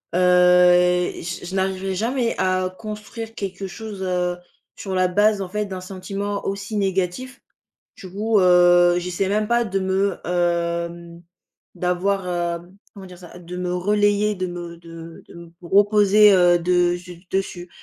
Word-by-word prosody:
heu 180 0 +5
et 180 0 +1
j 175 +1 -6
je 185 +2 -6
n'arriverai 190 0 -1
jamais, 235 +4 -1
à 185 0 0
construire 220 +1 -8
quelque 195 -2 -5
chose, 205 +1 -8
heu, 180 -1 -1 0.4
sur 190 -2 -5
la 185 0 +2
base, 205 +2 +2
en 180 - -8
fait, 210 +2 -2
d'un 185 -1 -6
sentiment 195 +2 -5
aussi 200 +2 -4
négatif, 195 +6 -2 0.6
du 190 - -10
coup, 210 +3 +1
heu, 175 -1 +5
j'essaie 180 +2 -2
même 210 +2 -1
pas 235 0 +2
de 195 -2 -2
me, 190 0 0
hem 170 -1 -2 0.5
d'avoir, 185 +2 -1
hem 175 +1 -4 0.2
comment 195 -2 -11
dire 180 -1 -13
ça? 175 0 -13
De 175 +1 -9
me 180 0 -3
relayer, 205 +2 +1
de 185 -1 -3
me 175 -1 -8
de 165 -1 -12
de - - -15
me 170 -1 -12 0.2
reposer, 205 +1 +5
heu, 175 -2 +5
de 175 0 +2
zu 175 0 -12
dessus 185 -2 -3
185 Hz, 160 wpm, -21 LUFS, 175-200 Hz, 0.6 s, heu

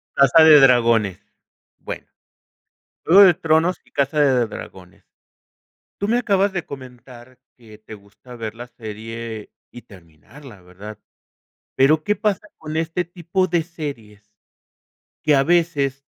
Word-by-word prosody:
Casa 140 +4 +5
de 155 -2 +8
Dragones. 115 -7 +3 0.6
Bueno, - - -8 1.0
Juego 190 +5 +7
de 185 - +6
Tronos 165 +3 +1
y - - -27
Casa 140 +2 -1
de 130 -5 +2
Dragones. 90 -4 -12 0.9
Tú 200 - -4
me 235 +2 +2
acabas 200 -4 +1
de 175 -3 -5
comentar 125 -2 -13 0.2
que 110 -3 -17
te 110 0 -12
gusta 105 +5 -16
ver 110 -1 -7
la 120 +1 -9
serie 110 -1 -9 0.2
y 120 - -12
terminarla, 100 - -17
¿verdad?, 100 +4 -12 0.8
pero 150 +4 +3
qué 210 - 0
pasa 210 0 -2
con 155 0 -7
este 165 +2 -2
tipo 175 +2 -2
de 170 -2 0
series, 115 - -9 0.9
que 150 - +3
a 135 - +3
veces 145 -5 0
135 Hz, 135 wpm, -20 LUFS, 110-165 Hz, 1.0 s, de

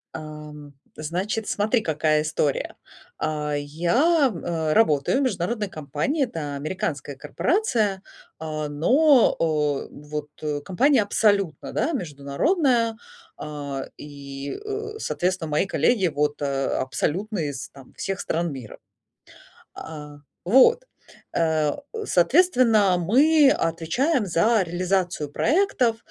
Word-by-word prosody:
Ам, 150 -2 -9 0.2
значит, 185 +8 -3
смотри, 215 +3 +1
какая 155 -3 +1
история. 150 -2 -1 0.4
А, 150 -1 -2
я, 235 - +2
э, 165 -3 -2
работаю 155 - +3
в - - +1
международной 210 -1 -1
компании, 155 - -2
это 160 - -4
американская 145 -2 -4
корпорация, 215 - 0 0.4
а, 155 -1 -4
но, 255 - +4 0.5
э, - - -11
вот, 150 0 -7
э, 150 -1 -2
компания 245 - +3
абсолютно, 200 -6 0
да, 320 - 0
международная, 230 - 0 0.4
а, 145 -3 -5
и, 140 -1 -7
э, 430 +1 -5
соответственно, 180 - -2
мои 150 +5 +1
коллеги 195 - +2
вот, 150 -1 -1
э, 135 -1 -1
абсолютно 185 +10 -2
из 145 -4 -4
там 135 -2 -16
всех 195 -1 -3
стран 170 -1 -2
мира, 125 -5 -9 1.0
а, 150 -2 -9 0.3
вот. 265 - +5 0.5
Э, 160 -3 +1 0.3
соответственно, 230 - +4
мы 275 - +4
отвечаем 205 - 0
за 200 +6 +3
реализацию 180 -2 -1
проектов, 255 - +1
170 Hz, 110 wpm, -24 LUFS, 150-235 Hz, 1.0 s, вот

